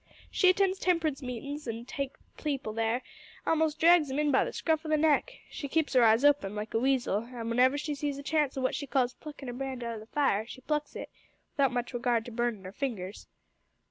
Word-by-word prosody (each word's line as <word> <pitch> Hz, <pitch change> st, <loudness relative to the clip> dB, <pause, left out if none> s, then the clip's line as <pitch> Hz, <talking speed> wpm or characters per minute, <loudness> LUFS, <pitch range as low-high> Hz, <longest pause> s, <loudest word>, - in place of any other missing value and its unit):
She 370 Hz, -, +4 dB
attends 385 Hz, 0 st, +2 dB
temperance 325 Hz, -6 st, +1 dB
meetin's 280 Hz, +3 st, -5 dB
an' 230 Hz, +1 st, -4 dB
takes 275 Hz, 0 st, -5 dB, 0.2 s
people 275 Hz, -7 st, -3 dB
there 225 Hz, +3 st, 0 dB, 0.4 s
a'most 320 Hz, -1 st, +1 dB
drags 335 Hz, -3 st, +6 dB
'em 265 Hz, -, -2 dB
in 300 Hz, -1 st, +2 dB
by 265 Hz, -, +4 dB
the -, -, -4 dB
scruff 320 Hz, -1 st, 0 dB
o' 315 Hz, -, -6 dB
the 310 Hz, -, +3 dB
neck. 310 Hz, -, +3 dB, 0.2 s
She 285 Hz, -, -5 dB
keeps 305 Hz, -1 st, 0 dB
'er 250 Hz, -, +7 dB
eyes 225 Hz, +4 st, +5 dB
open, 275 Hz, -9 st, +3 dB
like 210 Hz, +1 st, -5 dB
a 225 Hz, -, +2 dB
weasel, 245 Hz, -4 st, +1 dB
an' 240 Hz, -1 st, -7 dB
w'enever 255 Hz, +4 st, +4 dB
she 295 Hz, +1 st, -2 dB
sees 285 Hz, -1 st, -3 dB
a 280 Hz, -, -7 dB
chance 300 Hz, -2 st, 0 dB
o' -, -, -1 dB
what 255 Hz, -, +1 dB
she 285 Hz, -, -4 dB
calls 255 Hz, -1 st, +1 dB
pluckin' 290 Hz, -2 st, -10 dB
a 245 Hz, -, -4 dB
brand 260 Hz, -1 st, -4 dB
out 230 Hz, -1 st, -4 dB
o' -, -, -7 dB
the 215 Hz, -, -12 dB
fire, 225 Hz, -6 st, +1 dB
she 260 Hz, -, -10 dB
plucks 300 Hz, +2 st, -2 dB
it, -, -, -7 dB, 0.4 s
without 275 Hz, -3 st, +3 dB
much 245 Hz, +1 st, -3 dB
regard 235 Hz, -2 st, 0 dB
to 240 Hz, -, -8 dB
burnin' 230 Hz, -4 st, -2 dB
'er 185 Hz, -, -6 dB
fingers. 205 Hz, -6 st, -5 dB
270 Hz, 230 wpm, -30 LUFS, 235-295 Hz, 0.4 s, er